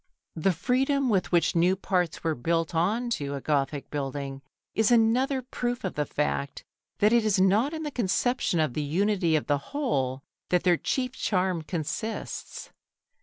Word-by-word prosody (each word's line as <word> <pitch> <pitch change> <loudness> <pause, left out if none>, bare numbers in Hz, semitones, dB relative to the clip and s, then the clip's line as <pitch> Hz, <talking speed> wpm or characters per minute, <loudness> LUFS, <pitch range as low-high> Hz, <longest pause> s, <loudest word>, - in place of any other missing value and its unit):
The 165 +4 +2
freedom 260 - +1
with 195 -4 +1
which 170 -2 +2
new 175 +3 +4
parts 180 -3 -1
were 165 -1 +1
built 165 +5 -1
on 215 +9 0
to 140 -9 -2
a - - -3
Gothic 140 0 -1
building 140 -1 -4 0.3
is 220 -1 +2
another 245 +3 +3
proof 245 -1 -3
of - - -2
the 150 -1 -2
fact 140 -1 -2 0.3
that 210 +2 +4
it 235 -1 +4
is 210 -3 +2
not 205 +9 +3
in 320 -1 -5
the 295 - -3
conception 240 -3 0
of 155 -5 +1
the 155 - -1
unity 175 +2 +1
of 155 - 0
the 145 -1 +1
whole 135 - -1 0.3
that 180 -1 +2
their 175 -2 +4
chief 255 - -1
charm 185 -8 0
consists. 170 +7 -5
185 Hz, 170 wpm, -27 LUFS, 155-235 Hz, 0.3 s, new